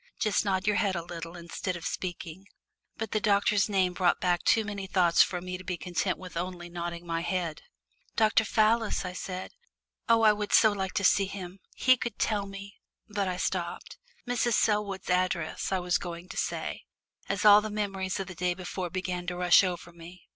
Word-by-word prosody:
Just 215 -2 +2
nod 190 -2 0
your 210 -1 +2
head 195 -3 +1
a 170 - -3
little, 170 0 -7
instead 175 +2 -4
of 170 -2 -7
speaking." 180 +1 -5 0.5
But 220 -2 -4
the 215 - +1
doctor's 205 0 +2
name 190 -3 +2
brought 180 -1 +2
back 175 -2 +1
too 225 - +3
many 200 -2 -5
thoughts 175 -3 +4
for 180 -3 +1
me 180 0 -5
to - - -10
be 185 -1 -3
content 180 +1 -1
with 185 -2 -10
only 175 0 -4
nodding 170 0 -5
my 165 -1 -2
head. 170 -3 -2 0.5
"Dr. 220 0 +4
Fallis," 220 0 +2
I 180 - -4
said. 185 0 -6 0.6
"Oh, 230 -1 +5
I 215 -1 +7
would 210 0 -4
so 220 - +7
like 190 -2 -3
to 200 - 0
see 195 +1 +4
him. 190 -1 -8 0.2
He 255 0 +4
could 235 +1 -4
tell 205 -3 0
me 195 0 -10 0.2
" - - -44
but 200 -2 +1
I 180 -1 -2
stopped. - - -3 0.3
"Mrs. 240 -1 +1
Selwood's 210 -4 +1
address" 180 -2 0
I 190 - +2
was 180 -1 0
going 175 +1 -7
to - - -8
say, - - -3 0.4
as 195 +2 -1
all 205 0 +9
the 215 - -4
memories 195 -2 -2
of 195 - -2
the 180 - -8
day 180 +1 -1
before 185 0 -5
began 180 -1 -4
to 180 0 -3
rush 180 +2 +6
over 175 -2 -3
me. 170 +2 -13
185 Hz, 205 wpm, -28 LUFS, 175-205 Hz, 0.6 s, all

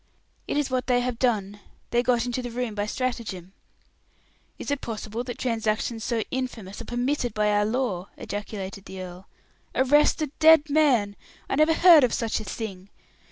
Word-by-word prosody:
"It - - -1
is 290 -3 0
what 255 -1 -1
they 245 -1 +3
have 245 -1 -3
done. 205 -5 0 0.3
They 240 - +3
got 245 -1 +1
into 245 +1 -2
the 245 - -5
room 240 -1 -3
by 205 0 -2
stratagem." 215 -7 -4 1.0
"Is - - -5
it 285 - -1
possible 220 +1 -5
that 245 -1 -6
transactions 225 -1 -1
so 230 -2 -1
infamous 235 -6 -4
are - - -8
permitted 245 0 -1
by 210 0 +2
our 205 0 +2
law?" 215 -6 -2
ejaculated 200 -1 -6
the 190 - -8
earl. 185 +1 -9 0.5
"Arrest 290 +5 +4
a 295 - -4
dead 315 -2 +6
man! 255 -10 +3 0.3
I - - -3
never 310 +3 +4
heard 335 -5 +8
of 245 - +2
such 230 -2 -1
a - - -6
thing. 195 -2 -6
235 Hz, 175 wpm, -25 LUFS, 205-255 Hz, 1.0 s, heard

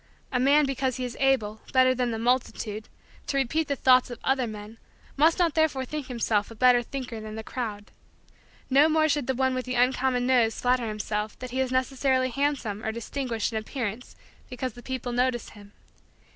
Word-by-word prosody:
A 250 - +1
man 285 +3 +5
because 265 -2 -1
he 255 - -3
is 240 -2 -6
able, 225 -6 +1
better 255 0 +5
than 250 -1 -1
the 225 - -2
multitude, 230 -3 -1 0.4
to 280 - -1
repeat 275 +4 0
the 280 - 0
thoughts 255 -1 +4
of 245 - -7
other 265 -2 +1
men 215 +1 -9 0.4
must 315 +4 +4
not 345 -4 +2
therefore 310 -5 +1
think 295 0 -5
himself 225 -4 0
a 230 - -11
better 250 +1 +5
thinker 245 -2 -6
than 215 0 -7
the 220 - -6
crowd. 215 -4 -5 0.8
No 280 +4 +5
more 315 0 +3
should 290 -3 0
the 265 - 0
one 260 +1 +1
with 255 0 -3
the 255 0 -3
uncommon 250 0 +2
nose 245 -3 +2
flatter 250 -1 +1
himself 210 0 -3
that 255 -1 -7
he 260 - -2
is 260 -1 0
necessarily 260 0 +1
handsome 255 -6 -1
or 220 - -1
distinguished 235 0 -3
in 220 - 0
appearance 230 0 -5 0.3
because 255 -1 -4
the 245 - -12
people 255 -1 -4
notice 245 0 0
him. 205 -1 -15
255 Hz, 195 wpm, -26 LUFS, 230-265 Hz, 0.8 s, man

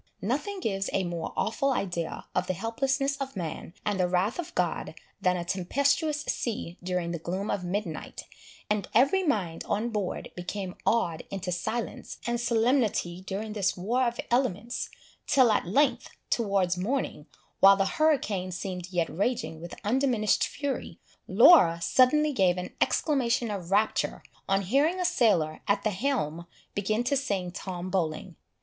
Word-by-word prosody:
Nothing 295 - -2
gives 195 - -1
a 195 - +1
more 175 -2 -4
awful 250 +5 +1
idea 175 -10 -2
of 180 0 0
the 185 - -1
helplessness 270 - 0
of 275 -2 -5
man, 170 -1 -5
and 205 -2 0
the 180 - +3
wrath 185 - 0
of 345 - -5
God, - - -1 0.3
than 180 0 +2
a 170 - -4
tempestuous 280 - +1
sea 195 -7 -3
during 180 -1 -2
the 170 - -3
gloom 185 +5 -3
of 185 - -2
midnight; 180 -3 -4 0.4
and 210 -2 -1
every 280 - +5
mind 200 - -1
on 225 +4 0
board 210 -5 -3
became 185 +1 -4
awed 170 -9 +2
into 190 -2 -4
silence 215 +7 -4
and 240 0 -1
solemnity 225 -7 +1
during 210 +3 -4
this 200 -3 0
war 240 +8 +1
of 235 0 -3
elements, 240 -2 0 0.4
till 255 -5 +5
at 210 - +1
length, 280 +10 +2 0.2
towards 195 -5 +1
morning, 205 - -2 0.3
while 195 0 +8
the 195 - +2
hurricane 220 - +1
seemed 180 0 -5
yet 175 -3 +1
raging 195 -4 -2
with 170 - -7
undiminished 235 -1 +2
fury, 285 -2 -4 0.3
Laura 170 - +7
suddenly 275 - +4
gave 185 -6 +3
an 180 0 -5
exclamation 245 -6 +1
of 185 -4 -5
rapture, 210 +3 +1 0.3
on 195 0 +2
hearing 285 - +2
a 360 - 0
sailor 205 - +2
at 200 0 +1
the 215 - +1
helm 185 - -2 0.3
begin 215 +3 0
to 260 +3 +1
sing 200 -10 -1
Tom 185 -1 -5
Bowling. 170 -1 -2
205 Hz, 155 wpm, -28 LUFS, 180-255 Hz, 0.4 s, while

